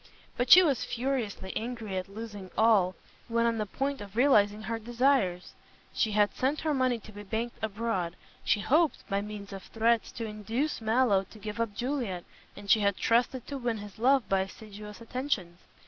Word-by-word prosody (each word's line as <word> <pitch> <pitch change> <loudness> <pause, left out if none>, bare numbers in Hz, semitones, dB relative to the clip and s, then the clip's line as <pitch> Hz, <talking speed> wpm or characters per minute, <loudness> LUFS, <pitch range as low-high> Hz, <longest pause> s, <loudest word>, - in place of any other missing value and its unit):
But 245 0 -1
she 370 - +10
was 280 -8 +1
furiously 235 -7 -3
angry 225 -3 -4
at 185 0 -3
losing 205 -2 -8
all, 205 -5 +4 0.3
when 230 0 +1
on 230 -1 +1
the 210 - -1
point 275 +4 -2
of 200 0 -10
realizing 215 -5 +4
her 230 +1 -3
desires. 235 -6 +1 0.4
She 215 - +1
had 205 0 +3
sent 275 +4 0
her 310 -1 0
money 255 -3 +2
to 215 -1 -13
be 205 0 -9
banked 220 +4 -4
abroad; 205 -5 -2 0.3
she 205 - +2
hoped, 310 +7 +2
by 200 -2 0
means 205 -1 -7
of 195 - -6
threats 230 +3 +1
to 230 - -4
induce 225 +7 -2
Mallow 220 -3 +3
to - - -13
give 210 +1 -6
up 220 -3 -2
Juliet, 240 -8 -2 0.3
and 205 0 -10
she 215 +3 +6
had 200 -2 +1
trusted 245 +2 +1
to 280 -1 -5
win 240 -3 -1
his 205 -1 -10
love 265 +1 +3
by 195 - +2
assiduous 210 +2 -7
attentions. 230 -8 -3
220 Hz, 185 wpm, -29 LUFS, 205-245 Hz, 0.4 s, she